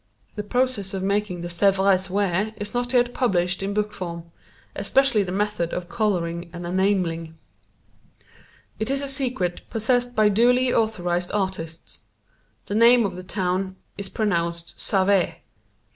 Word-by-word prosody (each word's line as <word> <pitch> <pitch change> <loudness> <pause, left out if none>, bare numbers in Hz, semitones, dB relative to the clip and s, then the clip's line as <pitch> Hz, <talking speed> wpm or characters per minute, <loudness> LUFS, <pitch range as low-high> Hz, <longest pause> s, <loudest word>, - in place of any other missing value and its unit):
The 210 - -4
process 210 -3 -1
of 190 - -3
making 200 -2 -1
the 175 - -4
Sèvres 190 +1 +2
ware 200 +2 0
is 205 0 -6
not 245 0 -1
yet 245 -1 +3
published 180 -7 +1
in 195 +1 -2
book 210 0 0
form, 170 -2 -6 0.4
especially 270 -5 +3
the 185 -2 -3
method 205 -3 -1
of 180 -1 -4
coloring 175 -7 -1
and 175 0 -7
enameling. 175 -3 0 1.4
It 220 - -2
is 275 +1 +1
a - - -2
secret 255 -10 0
possessed 245 +2 0
by 215 -1 +5
duly 245 +4 +3
authorized 180 -5 0
artists. 185 -5 -4 0.6
The - - -5
name 235 +2 +6
of 195 - -3
the 185 - -6
town 185 0 -2 0.2
is 200 -1 -6
pronounced 170 -5 -2
Save. 195 -1 +2
195 Hz, 145 wpm, -24 LUFS, 180-220 Hz, 1.4 s, name